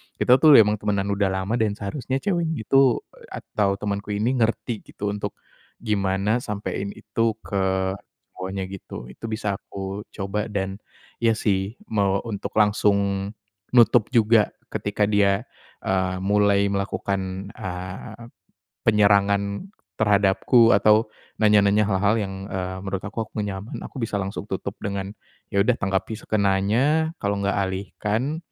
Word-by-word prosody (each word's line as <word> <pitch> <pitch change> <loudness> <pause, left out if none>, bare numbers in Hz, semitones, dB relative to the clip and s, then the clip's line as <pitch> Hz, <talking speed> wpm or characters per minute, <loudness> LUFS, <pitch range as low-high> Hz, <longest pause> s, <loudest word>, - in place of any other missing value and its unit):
kita 125 +1 +4
tuh 150 0 +8
emang 105 -2 +6
temanan 100 -1 -1
udah 100 0 +1
lama 95 +5 -1
dan 105 -2 +1
seharusnya 130 +6 -3
ceweknya 170 - -1
itu, 135 0 +4 0.2
atau 100 -2 -1
temanku 100 0 -3
ini, 110 +4 +1
ngerti 115 0 0
gitu, 105 0 -4
untuk 105 - -4 0.5
gimana 100 +1 +1
sampein 100 -3 -4
itu 115 -1 -1
ke 95 -1 0 0.5
cowoknya, 95 +1 -4
gitu. 95 -9 -8
Itu 115 - -8
bisa 105 -3 -2
aku 100 +2 -6
coba 100 +2 -3
dan 95 -2 -3 0.4
iya 115 -1 +4
sih, 100 +2 -1
mau 100 -3 +2
untuk 105 -4 -4
langsung 100 -2 +2 0.4
nutup 120 -2 +5
juga 110 -2 +4 0.2
ketika 105 0 0
dia, 100 -2 +2 0.4
eee, 95 -1 0
mulai 100 0 +3
melakukan, 100 -1 -2
eee, 95 +2 -7 0.6
penyerangan 100 - +3 0.3
terhadapku 105 +3 +4
atau 105 +2 +4 0.4
nanya-nanya 105 -1 +5
hal-hal 100 +1 +2
yang, 100 -3 -3 0.2
eee, 95 0 -3
menurut 95 -1 -3
aku 115 +3 -3
aku - - -27
enggak 105 - -1 0.2
nyaman, 110 - -8
aku - - -15
bisa 115 - -2
langsung 100 +1 -5
tutup 95 +1 -3
dengan 100 -1 -3 0.4
ya 100 - 0
udah 125 +3 +2
tanggapi 95 +3 -1
sekenanya, 110 +11 +1
kalau 100 0 0
enggak 100 +1 0
alihkan, 105 +8 -2
100 Hz, 135 wpm, -24 LUFS, 95-110 Hz, 0.6 s, tuh